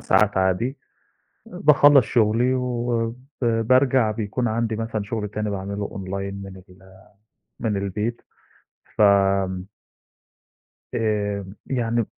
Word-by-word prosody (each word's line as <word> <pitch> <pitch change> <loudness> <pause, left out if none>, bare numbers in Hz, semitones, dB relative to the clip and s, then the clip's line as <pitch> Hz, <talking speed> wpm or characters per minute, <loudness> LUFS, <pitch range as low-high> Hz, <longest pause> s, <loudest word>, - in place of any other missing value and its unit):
ساعات 105 +1 +2
عادي. 95 +8 0 0.7
آآ - - -10
باخلّص 145 -3 +7
شُغلي 120 +3 +2
وب 120 -2 -1 0.3
بارجع 120 +1 +3
بيكون 110 +3 -2
عندي 110 0 -1
مثلًا 115 -1 -3
شُغل 105 0 -4
تاني 105 0 -3
باعمله 100 +1 -4
online 100 +1 -5
من 95 -1 -10
ال 95 +1 -18 0.6
من 110 -4 -1
البيت، 105 +4 -3 0.7
فم 95 -2 +3 1.3
آمم 105 -3 -1
يعني 120 -2 0
ب - - -3
105 Hz, 110 wpm, -23 LUFS, 100-120 Hz, 1.3 s, باخلّص